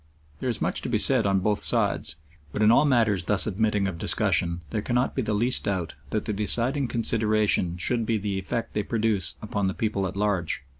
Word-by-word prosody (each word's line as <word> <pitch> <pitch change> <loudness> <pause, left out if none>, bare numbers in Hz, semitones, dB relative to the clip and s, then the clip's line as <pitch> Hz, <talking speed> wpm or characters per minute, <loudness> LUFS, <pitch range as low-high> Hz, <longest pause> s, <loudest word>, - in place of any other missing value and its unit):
There 130 - -2
is 115 - -2
much - - 0
to - - -4
be - - +1
said 125 -6 +3
on 95 -1 +1
both 105 +1 +1
sides, 75 - +1 0.4
but 110 - -1
in 105 - +6
all 135 +5 +5
matters 110 - +2
thus 105 0 +3
admitting 105 -1 0
of 90 -4 -5
discussion 85 +1 0
there 105 - -1
cannot 125 +3 0
be 130 - -1
the 110 -3 -2
least 120 +5 +1
doubt 95 -5 -2 0.2
that 110 - -2
the 105 - -2
deciding 120 +7 +1
consideration 110 -6 +1
should 115 +6 0
be 115 - +1
the 100 -1 -3
effect 105 +5 -4
they 105 - 0
produce 105 -5 0
upon 100 -2 -2
the 95 - -3
people 105 -3 -1
at 95 - -7
large. 95 -8 -1
105 Hz, 210 wpm, -25 LUFS, 95-115 Hz, 0.4 s, in